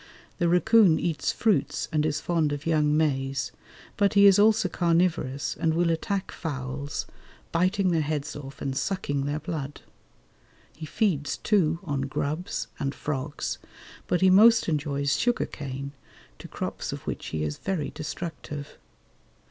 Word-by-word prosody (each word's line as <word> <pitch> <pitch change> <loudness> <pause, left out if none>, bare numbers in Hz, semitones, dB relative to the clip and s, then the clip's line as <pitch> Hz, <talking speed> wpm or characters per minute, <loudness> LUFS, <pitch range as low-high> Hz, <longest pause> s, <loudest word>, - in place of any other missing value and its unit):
The 175 - +2
racoon 185 -1 +5
eats 165 -3 -1
fruits 220 -3 0
and 155 -1 +1
is 150 0 -1
fond 160 -3 0
of 145 +1 -4
young 150 -2 +2
maize; 135 -4 0 0.5
but 200 0 +2
he 200 0 +7
is 200 0 +7
also 215 -1 +4
carnivorous, 165 -6 0
and 160 -1 +1
will 170 0 +2
attack 195 +4 -2
fowls, 140 -2 -4 0.5
biting 185 +2 +2
their 165 -2 +2
heads 150 0 -3
off 140 -1 -8
and 135 -1 -2
sucking 145 -5 -1
their 145 +1 -1
blood. 150 -3 -5 0.9
He 155 0 -7
feeds, 150 -8 0
too, 170 -7 +2
on 145 -6 -2
grubs 145 +5 -2
and 135 0 -2
frogs, 145 0 -3 0.5
but 180 - +1
he 190 0 +6
most 225 +4 +6
enjoys 140 -3 0
sugar 245 0 +1
cane, 140 -1 -6 0.5
to - - -9
crops - - -4
of - - -6
which - - -4
he 80 -1 -2
is 75 -1 -3
very 185 -7 -2
destructive. 150 -2 -6
155 Hz, 150 wpm, -26 LUFS, 145-180 Hz, 0.9 s, he